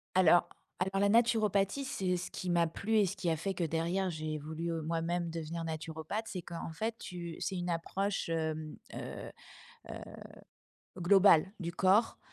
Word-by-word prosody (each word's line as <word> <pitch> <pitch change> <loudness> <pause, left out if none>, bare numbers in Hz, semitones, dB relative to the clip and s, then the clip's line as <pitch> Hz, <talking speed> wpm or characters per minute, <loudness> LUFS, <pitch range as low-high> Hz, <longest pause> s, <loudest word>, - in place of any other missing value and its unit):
Alors 175 -2 +6 0.3
alors, 195 +1 0
la 200 - +4
naturopathie, 220 +1 +3
c'est 185 -7 0
ce 180 - -5
qui 180 - -3
m'a 170 -1 +4
plu 215 +7 -1
et 205 -2 +5
ce 190 - -4
qui 175 - -1
a 160 - +2
fait 195 +4 -2
que 175 - -3
derrière 170 +4 0
j'ai 155 -1 -3
voulu 160 +3 -4
moi-même 165 +1 -1
devenir 165 0 -4
naturopathe, 160 +6 -4
c'est 185 -5 -5
qu'en 165 -1 -6
fait, 220 +7 -3
tu 170 -2 -6
c'est 190 - -2
une 175 0 -2
approche, 195 +3 -1
hem, 160 -1 -2 0.2
heu - - -6 0.6
heu, - - -5 1.0
globale 190 0 +6
du 170 0 -2
corps 195 +5 +3
175 Hz, 165 wpm, -33 LUFS, 165-195 Hz, 1.0 s, Alors